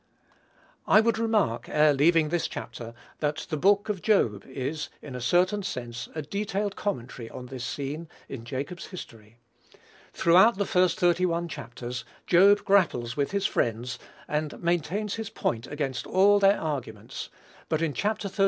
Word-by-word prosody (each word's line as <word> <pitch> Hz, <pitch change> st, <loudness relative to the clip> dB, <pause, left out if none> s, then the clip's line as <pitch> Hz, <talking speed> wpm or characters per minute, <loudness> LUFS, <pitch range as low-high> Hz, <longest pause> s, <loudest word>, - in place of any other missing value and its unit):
I -, -, +7 dB
would 225 Hz, 0 st, +2 dB
remark, 210 Hz, -, +1 dB
ere 150 Hz, 0 st, +4 dB
leaving 155 Hz, +2 st, +4 dB
this 170 Hz, +1 st, 0 dB
chapter, 115 Hz, 0 st, -7 dB, 0.2 s
that 150 Hz, +1 st, -1 dB
the -, -, +1 dB
book 200 Hz, +6 st, +3 dB
of 205 Hz, -4 st, -2 dB
Job 115 Hz, -, +2 dB
is, 135 Hz, +4 st, -4 dB
in 145 Hz, -, -9 dB
a 125 Hz, -, -5 dB
certain 185 Hz, -, +2 dB
sense, 125 Hz, -9 st, -5 dB
a 155 Hz, -, -3 dB
detailed 200 Hz, +4 st, -2 dB
commentary 125 Hz, -, -4 dB
on 125 Hz, -, -8 dB
this 125 Hz, 0 st, -7 dB
scene 145 Hz, +6 st, -4 dB, 0.2 s
in 130 Hz, -4 st, -7 dB
Jacob's 140 Hz, +8 st, -5 dB
history. 115 Hz, -, -11 dB, 0.7 s
Throughout 190 Hz, +6 st, +5 dB
the 200 Hz, -, 0 dB
first 185 Hz, -1 st, +2 dB
thirty 175 Hz, 0 st, +3 dB
one 170 Hz, 0 st, -1 dB
chapters, 120 Hz, -4 st, -6 dB, 0.2 s
Job 200 Hz, +3 st, +5 dB
grapples 155 Hz, -, +2 dB
with 140 Hz, -1 st, 0 dB
his 200 Hz, 0 st, -1 dB
friends, 120 Hz, +2 st, -1 dB, 0.3 s
and 150 Hz, 0 st, -2 dB
maintains 175 Hz, +4 st, -1 dB
his 225 Hz, -2 st, -4 dB
point 115 Hz, +1 st, -2 dB
against 140 Hz, -3 st, -3 dB
all 205 Hz, +2 st, +5 dB
their 200 Hz, +1 st, +4 dB
arguments; 130 Hz, -9 st, -5 dB, 0.4 s
but 160 Hz, 0 st, +1 dB
in 155 Hz, -3 st, 0 dB
Chapter 210 Hz, +3 st, -1 dB
xxxii. 195 Hz, +2 st, -11 dB
160 Hz, 160 wpm, -27 LUFS, 125-195 Hz, 0.7 s, I